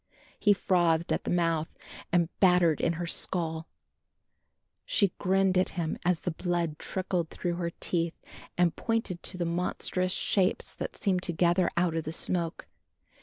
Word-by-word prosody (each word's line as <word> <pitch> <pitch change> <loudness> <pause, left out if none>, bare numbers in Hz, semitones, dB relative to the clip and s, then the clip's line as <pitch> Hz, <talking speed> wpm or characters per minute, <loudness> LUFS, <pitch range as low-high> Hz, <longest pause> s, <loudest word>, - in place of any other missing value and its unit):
He 205 - +4
frothed 170 -4 +2
at - - -2
the - - -2
mouth 165 -2 +1 0.4
and 170 -1 +3
battered 180 -4 +4
in 170 - +2
her 170 +1 -4
skull. 165 -1 -1 1.2
She 200 -4 +2
grinned 190 -1 +3
at 185 - +1
him 165 -2 -1
as 175 -1 +1
the 180 - -2
blood 170 -2 -2
trickled 180 -3 -2
through 175 -1 -3
her 170 -1 -1
teeth 170 -1 0 0.4
and 175 -2 +3
pointed 225 -6 -2
to 185 - -2
the 175 - -1
monstrous 180 +1 -1
shapes 190 0 +1
that - - -5
seemed 190 -7 +1
to 175 - -2
gather 175 +1 +3
out 175 -1 +2
of 165 - -2
the 155 - -3
smoke. 170 0 -1
175 Hz, 160 wpm, -29 LUFS, 165-185 Hz, 1.2 s, He